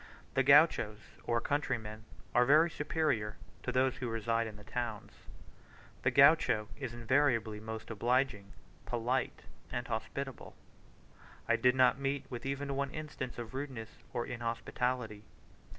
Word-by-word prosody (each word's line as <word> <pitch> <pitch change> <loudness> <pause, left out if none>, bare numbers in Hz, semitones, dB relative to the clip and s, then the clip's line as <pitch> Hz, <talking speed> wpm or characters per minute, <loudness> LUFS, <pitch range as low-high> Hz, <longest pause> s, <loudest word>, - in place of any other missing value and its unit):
The 135 - +3
Gauchos, 140 -6 +5 0.3
or 115 0 +1
countryrmen, 110 -6 -2 0.3
are 125 - +5
very 155 +6 +5
superior 150 - -1 0.2
to - - -2
those 130 0 +2
who 125 -2 -3
reside 115 0 0
in 110 - -8
the 105 - -13
towns. 115 -2 -4 0.9
The - - +3
Gaucho 135 -7 +5
is 130 -5 -5
invariably 115 -3 +1
most 110 +1 -7
obliging, 115 -2 0 0.4
polite, 120 +3 -1 0.3
and 120 -1 -3
hospitable: 135 +4 -5 0.9
I - - +4
did 125 0 +3
not 130 +1 +4
meet 140 0 -1
with 120 +1 -5
even 140 0 -2
one 140 0 -1
instance 150 -4 -6
of 120 0 -6
rudeness 130 -5 -6
or 120 -2 -2
inhospitality. 115 -1 -2
125 Hz, 135 wpm, -33 LUFS, 110-140 Hz, 0.9 s, Gauchos